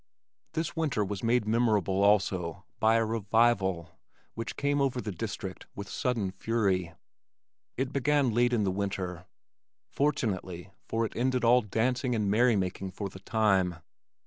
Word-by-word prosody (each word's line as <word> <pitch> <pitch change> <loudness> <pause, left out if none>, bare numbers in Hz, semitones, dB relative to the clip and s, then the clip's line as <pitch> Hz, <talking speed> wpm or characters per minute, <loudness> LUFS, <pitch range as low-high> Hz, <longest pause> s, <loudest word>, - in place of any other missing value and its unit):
This 160 +1 -2
winter 145 -10 0
was 100 0 -4
made 115 -1 +2
memorable 105 -4 +2
also 95 -5 +1
by 110 +1 +4
a 115 0 +3
"revival" 105 -5 +1 0.3
which 115 0 -5
came 145 0 +1
over 130 -2 +1
the 110 - -4
district 90 - -6
with 100 0 -6
sudden 115 -6 -1
fury. 95 -6 -1 0.8
It 130 +1 -2
began 140 -3 +2
late 120 +2 +3
in 115 -4 +2
the 95 - +1
winter 95 -2 -3 0.6
fortunately, 95 - -1 0.2
for 115 0 0
it - - -7
ended 125 0 0
all 120 +2 +6
dancing 125 +4 0
and 105 -3 0
merry 120 +2 +4
making 95 0 -2
for 100 +1 -4
the 95 - -11
time. 95 -4 +1
110 Hz, 145 wpm, -29 LUFS, 95-120 Hz, 0.8 s, all